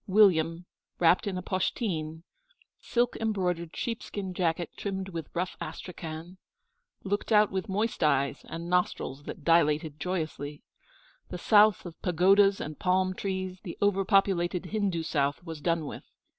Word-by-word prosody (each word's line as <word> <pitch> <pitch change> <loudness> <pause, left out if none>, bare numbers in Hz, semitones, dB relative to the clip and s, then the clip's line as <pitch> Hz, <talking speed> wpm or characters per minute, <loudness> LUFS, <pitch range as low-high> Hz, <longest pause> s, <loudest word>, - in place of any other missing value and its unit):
William, 175 -4 +4 0.3
wrapped 175 +3 +4
in 190 -2 -2
a 180 - -4
poshteen 165 -5 -2 0.6
silk 240 0 0
embroidered 180 -6 -1
sheepskin 205 -5 -4
jacket 175 -2 -1
trimmed 195 -1 -4
with 165 -4 -6
rough 180 +2 -2
astrakhan 170 +1 -7 0.6
looked 205 +3 -2
out 210 -1 +5
with 190 +2 -3
moist 215 +4 -1
eyes 140 -2 +1
and 165 +1 -6
nostrils 175 -5 -1
that 160 - -7
dilated 155 -2 +2
joyously. 155 -5 -4 0.7
The 180 - -5
South 210 +2 +5
of 170 -2 -10
pagodas 195 +3 +4
and 155 -1 -6
palm 185 0 +2
trees, 185 -1 -4
the 175 -5 -7
over 200 -1 +2
populated 190 -3 +2
Hindu 195 -4 -1
South, 145 0 0
was 160 -3 -7
done 165 0 0
with. - - -7
180 Hz, 140 wpm, -29 LUFS, 165-195 Hz, 0.7 s, out